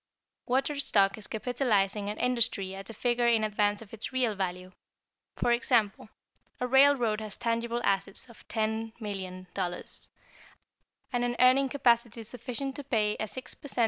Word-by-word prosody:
Watered 270 +3 +1
stock 195 -7 +3
is 210 - -8
capitalizing 210 -4 0
an 210 - -4
industry 225 -6 +1
at 195 +1 -8
a - - -7
figure 240 +1 +1
in 230 -2 +4
advance 210 0 +1
of 210 - -19
its 225 0 -5
real 255 -4 +1
value. 185 -2 -4 0.6
For 240 - +1
example: 220 -3 +1 0.5
a 250 - 0
railroad 250 -4 +4
has 215 -2 -6
tangible 235 0 -1
assets 195 +4 -1
of 235 - -17
$10,000,000, 200 -5 -4 1.1
and 245 0 +1
an 240 0 0
earning 260 +2 +5
capacity 235 -4 +2
sufficient 250 +4 -4
to 285 - -6
pay 215 -6 +1
a 220 - -2
6 260 +4 -6
per - - -11
cent. 270 - +3
225 Hz, 150 wpm, -29 LUFS, 205-250 Hz, 1.1 s, earning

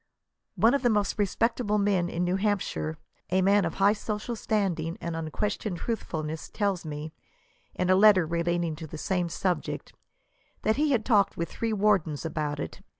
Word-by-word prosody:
One 225 +2 +4
of 280 - +2
the 245 - +3
most 210 -1 0
respectable 210 +1 +1
men 195 -4 +1
in 175 +1 -2
New 180 +1 +1
Hampshire, 195 -6 -1 0.3
a 185 +1 +2
man 200 0 +4
of 165 - -3
high 200 +1 +4
social 215 +2 -4
standing 185 -7 -1
and 170 -1 -4
unquestioned 180 +5 -2
18 - - -7
truthfolness, 160 -9 -3
tells 200 -4 -1
me« 155 0 -6 0.6
in 180 - 0
a - - +6
letter 195 -3 +6
relating 170 0 -1
to 160 0 -7
the 155 - -8
same 180 +1 -1
subject, 180 +1 -2 0.7
that 220 +2 +2
he 300 +1 +2
had 240 -6 +1
talked 205 -5 +3
with 170 0 -2
three 230 -1 -2
wardens 195 -8 +1
about 150 -2 -2
it. - - -6
190 Hz, 175 wpm, -27 LUFS, 165-210 Hz, 0.7 s, a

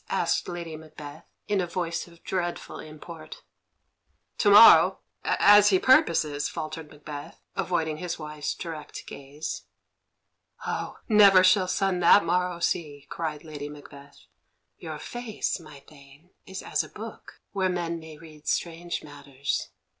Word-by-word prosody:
asked - - 0
Lady 170 -2 -6
Macbeth, 155 -1 -11 0.2
in 205 -2 +1
a 175 - -2
voice 170 0 -3
of 170 -1 -19
dreadful 175 -2 -3
import. 155 +1 -10 1.0
"To 205 - +4
morrow 210 +3 +8 0.2
as 205 0 +6
he 190 - +4
purposes," 160 - +3
faltered 155 -1 -6
Macbeth, 145 -1 -9 0.2
avoiding 160 -3 -1
his 175 +1 -4
wife's 150 -1 -5
direct 160 -3 -7
gaze. 140 +3 -7 1.0
"Oh, - - -4
never 200 -4 +7
shall 185 0 +4
sun 190 0 0
that 175 +2 +6
morrow 180 0 0
see!" 150 -4 -2
cried 155 -2 -4
Lady 150 -2 -7
Macbeth. 145 -1 -14 0.5
"Your 160 -2 -6
face, 235 +3 -4
my 150 -4 -13
Thane, 140 +4 -19 0.2
is 190 0 -7
as - - 0
a - - -12
book, - - -10
where 190 -2 0
men 170 -2 -2
may 160 -1 -11
read 155 -1 -15
strange 170 0 -2
matters. 140 -2 -4
165 Hz, 135 wpm, -26 LUFS, 150-180 Hz, 1.0 s, morrow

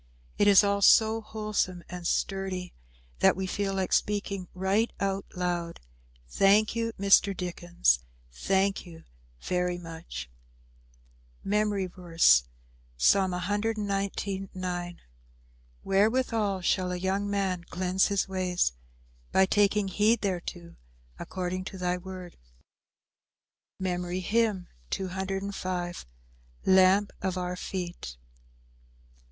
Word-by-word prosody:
It 205 - +4
is 200 0 +8
all 200 0 +1
so 220 +2 +5
wholesome 210 -5 -2
and 180 -2 -5
sturdy 190 -2 -2 0.5
that - - +5
we 190 +1 -3
feel 195 +1 -2
like 190 -1 -1
speaking 200 -3 0
right 195 +5 +1
out 195 0 -1
loud, 175 -2 -2 0.5
"Thank 200 - +3
you, 230 0 -1
Mr. 200 -1 +4
Dickens, 175 - +1 0.3
thank 195 - 0
you 170 -3 -13 0.4
very 180 0 0
much." 165 - -8 1.2
MEMORY 205 -1 +1
VERSE, 170 - +3 0.5
Psalm 190 - +4
119: 200 0 -2
9 175 -1 -4 0.8
"Wherewithal 210 -1 +1
shall 180 +1 +1
a - - -2
young 195 +3 -1
man 190 -3 -1
cleanse 185 +2 +1
his 200 -1 0
ways? 185 - 0 0.6
By 190 - +5
taking 205 +1 +2
heed 210 +4 +2
thereto 175 -3 -4 0.4
according 185 0 -4
to 190 - -7
thy 180 0 -1
word." 185 -1 -9 1.4
MEMORY 180 -1 -2
HYMN 210 -2 +1 0.2
_"Lamp 185 - -1
of 185 -1 -2
our 180 0 -2
feet." 175 - -6
190 Hz, 100 wpm, -28 LUFS, 180-200 Hz, 1.4 s, is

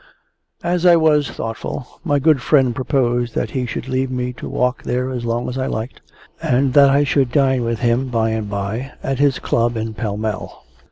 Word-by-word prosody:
As 175 0 0
I 175 -1 +7
was 155 -3 +3
thoughtful, 115 +3 -6
my 145 -5 +1
good 145 -1 +3
friend 135 -2 +3
proposed 120 -2 0
that - - -1
he 130 -3 -2
should 115 +2 -5
leave 130 0 -1
me 125 -1 -3
to - - -8
walk 125 +1 0
there 125 +1 -2
as 125 -2 -4
long 120 +1 -1
as 130 +1 -4
I 130 - -1
liked, 110 +4 -5 0.4
and 130 +1 +1
that 140 -1 +7
I 140 +1 +4
should 135 -3 +1
dine 130 -2 +2
with 115 -1 -2
him 120 +2 +1
by 115 -2 0
and 110 -2 -3
by 100 +7 -4
at 135 -1 -2
his 140 -2 +3
club 115 0 0
in 110 0 -3
Pall 105 -2 -3
Mall. 110 -2 -5
125 Hz, 205 wpm, -19 LUFS, 115-135 Hz, 0.4 s, I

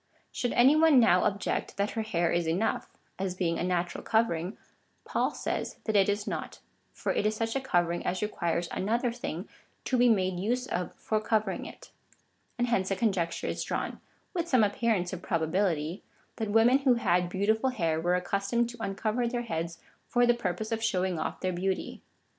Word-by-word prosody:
Should 245 - -2
any 265 +5 +6
one 310 -4 +6
now 185 -6 +5
object, 200 0 -1
that 200 +1 0
her 225 - -2
hair 175 -6 0
is 170 -1 +1
enough, 190 +7 0 0.3
as 190 -1 -2
being 170 -3 0
a - - -1
natural 180 -1 -1
covering, 195 -4 0 0.5
Paul - - +1
says - - -3
that 220 - -1
it 195 0 +5
is 205 0 0
not, - - -4 0.3
for - - -2
it - - 0
is 215 +1 +1
such 225 +2 -2
a 270 - 0
covering 175 -8 +1
as 185 +3 -1
requires 170 -4 -1
another 235 +5 0
thing 200 -6 -5 0.4
to 255 - +1
be 245 0 +6
made 185 -4 +2
use 245 +6 0
of 180 -7 -3
for 215 -1 -1
covering 215 -3 0
it. - - -13 0.7
And 240 - +2
hence 190 -5 +1
a 195 - +1
con 220 0 +2
jecture 170 -2 -2
is - - -2
drawn, - - -3 0.3
with 345 -3 -1
some 255 -8 +4
appearance 205 -3 +1
of 185 - -5
probability 165 0 0 0.2
— - - -37
that 220 -2 -2
women 225 +5 +5
who 265 -3 +4
had 180 -6 +1
beautiful 220 +7 +1
hair 165 -10 0
were 175 +2 +2
accustomed 200 +6 0
to 240 - -12
uncover 215 +4 -1
their 240 0 -2
heads 165 -5 -3 0.3
for 245 0 +3
the 240 - +5
purpose 215 -2 -3
of 225 0 -1
showing 185 -5 0
oif 155 - -3
their 185 -1 0
beauty. 190 +2 -2
200 Hz, 195 wpm, -29 LUFS, 180-235 Hz, 0.7 s, any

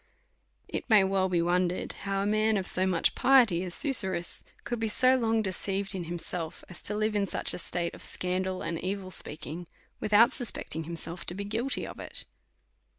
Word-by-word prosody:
It - - -5
may 215 -3 +7
well 190 0 +1
be 175 -2 +1
wondered 180 +1 0
how 195 0 -2
a - - -1
man 215 +1 +2
of 190 - -2
so 185 +1 0
much 175 -3 +2
piety 240 -10 +4
as 180 -2 -3
Susurrus 190 - +1 0.2
could 240 -1 -3
be 225 - 0
so 255 +4 +4
long 225 -3 +1
deceiv 195 +1 -2
ed 195 - +2
in 180 - -3
himself, 170 -1 -4
as 180 - -8
to 210 - -1
live 215 0 0
in 200 -1 +1
such - - 0
a - - -4
slate 170 0 -3
of - - -11
scandal 185 +1 -2
and 165 -1 -3
evil 190 0 -3
speaking, 160 +1 -2 0.3
without 225 +5 +5
suspecting 185 - 0
himself 170 +1 -5
to 175 - -1
be 200 - -4
guilty 225 +6 -1
of - - -9
it. - - -2
190 Hz, 195 wpm, -29 LUFS, 175-215 Hz, 0.3 s, may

